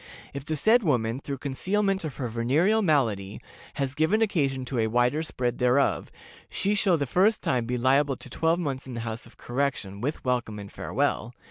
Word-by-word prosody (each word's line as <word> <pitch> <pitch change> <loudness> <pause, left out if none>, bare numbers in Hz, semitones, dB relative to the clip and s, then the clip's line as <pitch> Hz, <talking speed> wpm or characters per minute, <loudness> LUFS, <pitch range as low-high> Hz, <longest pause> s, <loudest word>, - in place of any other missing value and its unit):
If 140 0 -6
the 155 - -1
said 225 +9 +4
woman, 125 - 0
through 140 -1 -5
concealment 195 +8 0
of 155 -4 -5
her 130 - -3
venereal 140 - +2
malady, 115 - +1 0.4
has 135 -1 -2
given 160 +9 +2
occasion 140 -11 0
to 125 -1 -2
a 110 - +2
wider 125 +6 +2
spread 125 -6 -2
thereof, 125 +2 +2 0.4
she 200 +2 0
shall 195 -4 +3
the 145 - -1
first 195 - +2
time 120 -3 0
be 125 0 -1
liable 135 +2 +2
to - - -10
twelve 165 +1 +1
months 140 -6 -3
in 125 - -6
the 115 - -3
House 115 0 -5
of - - -19
Correction, 120 -6 -2
with 145 +3 -3
welcome 120 -4 -1
and 100 -1 -8
farewell. 120 +3 -2
135 Hz, 195 wpm, -26 LUFS, 120-160 Hz, 0.4 s, said